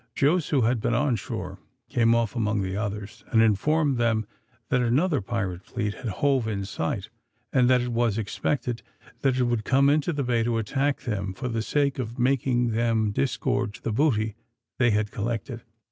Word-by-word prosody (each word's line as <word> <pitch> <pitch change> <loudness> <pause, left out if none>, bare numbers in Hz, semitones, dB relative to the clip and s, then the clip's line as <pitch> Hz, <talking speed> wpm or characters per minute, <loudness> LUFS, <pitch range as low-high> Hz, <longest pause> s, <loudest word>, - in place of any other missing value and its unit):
Jos, 155 +3 +2
who 140 -4 +2
had 115 0 +1
been 120 - +1
on 135 -1 +2
shore, 95 -4 -5 0.3
came 115 0 +3
off 115 -1 0
among 105 -3 0
the 95 0 -3
others, 105 0 -4
and 115 - +2
informed 135 +6 +3
them 115 -2 +1 0.4
that 125 -1 +2
another 140 - +2
pirate 95 -4 -3
fleet 105 -4 -3
had 125 - -7
hove 130 +3 +1
in 100 -3 -2
sight, 80 -4 -3 0.4
and 125 -1 +4
that 125 -1 +5
it 125 - -2
was 115 -2 +1
expected 120 +3 -2 0.4
that 135 -2 +2
it 130 - +3
would 120 -3 0
come 140 +4 +4
into 150 +3 +1
the 145 -3 -1
bay 120 -2 +1
to 115 0 0
attack 135 +6 0
them 100 -5 -3
for 125 +5 -4
the 115 -1 -1
sake 140 +3 0
of 115 -1 -4
making 125 -1 +2
them 110 -2 +1
disgorge 130 -1 -1
the 115 - -2
booty 110 -4 +1 0.5
they 120 -2 +4
had 105 -1 +1
collected. 115 0 -3
120 Hz, 185 wpm, -26 LUFS, 110-130 Hz, 0.5 s, that